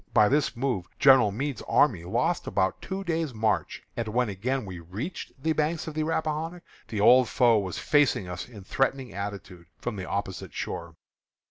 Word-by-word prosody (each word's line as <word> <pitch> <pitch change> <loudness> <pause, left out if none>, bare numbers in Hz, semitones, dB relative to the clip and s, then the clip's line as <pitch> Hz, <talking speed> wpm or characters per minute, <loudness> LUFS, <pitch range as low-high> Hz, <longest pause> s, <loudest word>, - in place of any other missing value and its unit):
By 105 0 +6
this 145 -1 +1
move 120 -8 -1
General 130 -7 +6
Meade's 135 +6 -3
army 100 - +3
lost 125 - 0
about 95 0 0
two 195 +1 -4
days' 165 -7 -2
march; 110 0 0
and 115 -1 -2
when 120 +2 +1
again 115 +6 -2
we 90 -3 -7
reached 100 - -6
the 160 - +2
bank 155 +1 0
of 160 - -5
the 155 - -1
Rappahannock, 160 +2 -2 0.2
the 105 - -4
old 125 +3 +6
foe 120 -4 +4
was 95 -3 -4
facing 145 -10 +2
us 90 +5 -6
in 105 -5 -11
threatening 135 +2 -1
attitude 100 -3 -6
from 105 - -4
the 95 -1 -5
opposite 100 -2 -4
shore. 85 -2 -5
120 Hz, 175 wpm, -27 LUFS, 100-150 Hz, 0.2 s, By